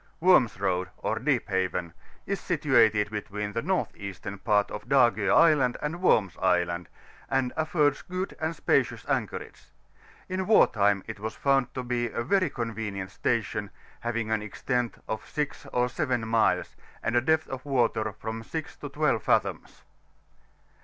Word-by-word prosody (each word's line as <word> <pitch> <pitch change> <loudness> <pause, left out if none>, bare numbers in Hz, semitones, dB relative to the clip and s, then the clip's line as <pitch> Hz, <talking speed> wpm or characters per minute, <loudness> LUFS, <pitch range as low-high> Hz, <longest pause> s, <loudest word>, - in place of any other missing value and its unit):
WO&BIS 165 - +4
&OADy 95 -2 0
ox - - -1
VEEP - - +1
BAVEH, 90 -3 -1 0.3
is - - -2
situated 105 -1 +3
between 105 -1 -4
the 115 - -1
N. 185 +8 0
Eastern 100 0 -7
part 105 -1 +2
of 105 +4 -7
Dago 120 -6 +4
Island 150 -7 +5
and 160 +4 -4
Worms 100 - +3
Island, 90 -2 +1 0.4
and 135 -2 0
afibrds 155 -3 +1
^ood 185 +1 -3
and 160 +1 -2
spacious - - +1
anchorage; - - -3 0.6
in 185 0 -2
war 220 - +7
time 100 -2 +1
it 110 -2 -7
was 110 +1 -5
found 135 -2 +2
to 130 - -3
be 120 -1 -1
a 115 +1 -3
very 185 +5 +2
convenient 110 -6 -4
station, 105 -2 -1 0.3
having 115 -2 -2
an 110 -1 +1
extent 120 +3 -2
of 110 - -5
6 150 -1 -3
or 125 0 +2
7 120 -2 -1
miles, 100 -6 +1 0.3
and 115 - 0
a 120 - +5
depth 160 +4 +2
of 130 -1 -6
water 120 -6 +1
from 110 +2 -6
6 160 +8 -6
to 145 - -7
12 145 -6 +1
fathoms. - - -1
115 Hz, 155 wpm, -27 LUFS, 105-140 Hz, 0.6 s, war